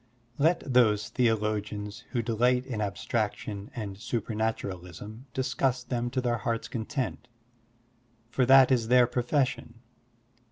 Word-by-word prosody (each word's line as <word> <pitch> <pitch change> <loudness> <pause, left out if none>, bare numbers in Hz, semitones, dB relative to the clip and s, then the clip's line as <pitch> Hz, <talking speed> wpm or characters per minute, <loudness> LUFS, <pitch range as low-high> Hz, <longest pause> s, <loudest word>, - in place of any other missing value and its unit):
Let 165 +4 +3
those 105 -4 +4
theologians 105 -2 -1
who 120 -2 -1
delight 125 +3 +2
in 120 -5 -4
abstraction 100 0 -3
and 100 -5 -5
supematuralism 110 -2 -4
discuss 130 0 0
them 120 -1 -2
to 130 +1 -1
their 120 -1 0
hearts' 115 -1 -2
content, 125 +1 -4 1.0
for 130 - +2
that 135 0 +7
is 120 -4 +2
their 125 +1 +6
profession. 125 +2 -1
120 Hz, 115 wpm, -28 LUFS, 105-125 Hz, 1.0 s, that